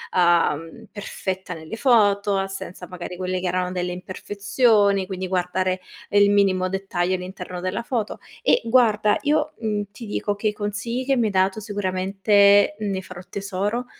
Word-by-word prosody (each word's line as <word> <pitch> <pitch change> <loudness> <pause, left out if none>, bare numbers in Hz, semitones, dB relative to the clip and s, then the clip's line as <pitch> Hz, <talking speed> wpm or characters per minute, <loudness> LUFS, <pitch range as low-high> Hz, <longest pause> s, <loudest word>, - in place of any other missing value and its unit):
uhm, 165 -3 +2
perfetta 190 -3 -5
nelle 160 +5 -7
foto, 205 -5 +3
senza 195 -2 -7
magari 180 0 -7
quelle 185 0 -2
che 180 - -2
erano 180 0 -1
delle 180 -1 -2
imperfezioni, 200 +2 +1
quindi 185 -1 -4
guardare 185 0 -1 0.3
il 205 0 +5
minimo 190 -2 +3
dettaglio 185 -1 -1
all'interno 180 0 -7
della 185 +4 -2
foto. 235 -3 -3 0.2
E - - +4
guarda 220 -3 +3
io, 300 +1 +1
mhmm, 210 -2 -2
ti 235 - -10
dico 205 -1 -2
che 215 +1 0
i - - -4
consigli 215 +4 -3
che 270 0 +2
mi 235 - +2
hai 215 - 0
dato 190 +2 +1
sicuramente 200 0 +3
ne 200 -3 -2
farò 180 -1 -10
tesoro, 200 +4 -2
195 Hz, 155 wpm, -23 LUFS, 185-210 Hz, 0.3 s, il